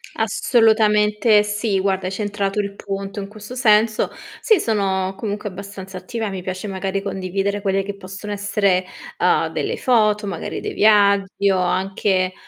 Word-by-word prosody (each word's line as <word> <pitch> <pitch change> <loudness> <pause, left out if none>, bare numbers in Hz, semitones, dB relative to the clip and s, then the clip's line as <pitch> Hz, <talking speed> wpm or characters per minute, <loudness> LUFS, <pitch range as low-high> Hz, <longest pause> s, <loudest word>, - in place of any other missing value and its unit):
Assolutamente 210 -2 +3
sì. 210 -1 -1
Guarda, 190 -1 0
hai - - -3
centrato 205 0 -2
il 200 -1 -3
punto 195 +1 -5
in 195 - -5
questo 210 +4 -10
senso. 220 -2 +3 0.3
Sì, 435 -6 +4
sono 195 -3 0
comunque 210 0 -4
abbastanza 190 0 -9
attiva. 220 +4 -4
Mi 190 -1 -5
piace, 185 +3 -5
magari, 195 0 -3
condividere 195 +1 -2
quelle 195 -1 0
che 200 0 -5
possono 195 +2 -8
essere, 200 -2 +1 0.3
uhm, - - +2
delle - - -3
foto, 215 -4 +2
magari 175 -4 -4
dei - - -4
viaggi 200 -2 +3
o 190 - +2
anche, 185 0 0
200 Hz, 150 wpm, -21 LUFS, 190-210 Hz, 0.3 s, Sì